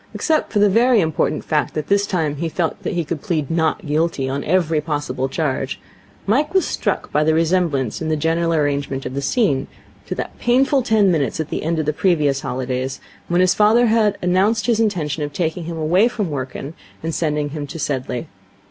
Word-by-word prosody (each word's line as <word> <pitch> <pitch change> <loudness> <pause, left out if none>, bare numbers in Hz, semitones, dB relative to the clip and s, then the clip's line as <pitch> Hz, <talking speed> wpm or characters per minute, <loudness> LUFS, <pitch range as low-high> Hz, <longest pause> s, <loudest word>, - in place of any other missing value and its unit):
Except 315 -1 0
for - - -1
the 205 0 +5
very 230 +4 +4
important 160 -4 0
fact 150 -2 0
that 155 -1 -2
this 200 +2 +2
time 155 -6 -1
he 165 +2 -2
felt 165 0 -2
that - - -3
he 175 -1 0
could 160 +1 -4
plead 165 -9 -2
Not 165 +4 0
Guilty 150 -2 0
on 140 +2 -2
every 165 -4 +2
possible 145 -4 -2
charge, 135 -3 -2 0.5
Mike 295 - +1
was 380 - +4
struck - - -2
by 150 - +2
the 155 +1 +2
resemblance 165 - +1
in 160 - -2
the 155 - +2
general 165 +2 0
arrangement 145 -3 -1
of 130 - -4
the 140 - -2
scene 140 - +1 0.4
to - - -3
that - - -6
painful 265 +3 +3
ten 215 -5 +3
minutes 155 -4 0
at 160 - -3
the - - -3
end 165 +1 -1
of 155 - -1
the 150 - 0
previous 150 -6 +1
holidays, 130 +1 -3 0.3
when 175 +1 +2
his 185 0 +4
father 215 +4 +4
had 220 -3 +2
announced 195 +4 +2
his 230 -2 +2
intention 165 -9 0
of 145 -1 -3
taking 170 +1 -2
him 165 0 -5
away 175 +8 +3
from 210 -8 -3
Wrykyn 135 +2 -5 0.3
and 165 0 -2
sending 150 -1 -1
him 145 0 -5
to 165 - -7
Sedleigh. 130 -2 -3
160 Hz, 205 wpm, -20 LUFS, 145-195 Hz, 0.5 s, the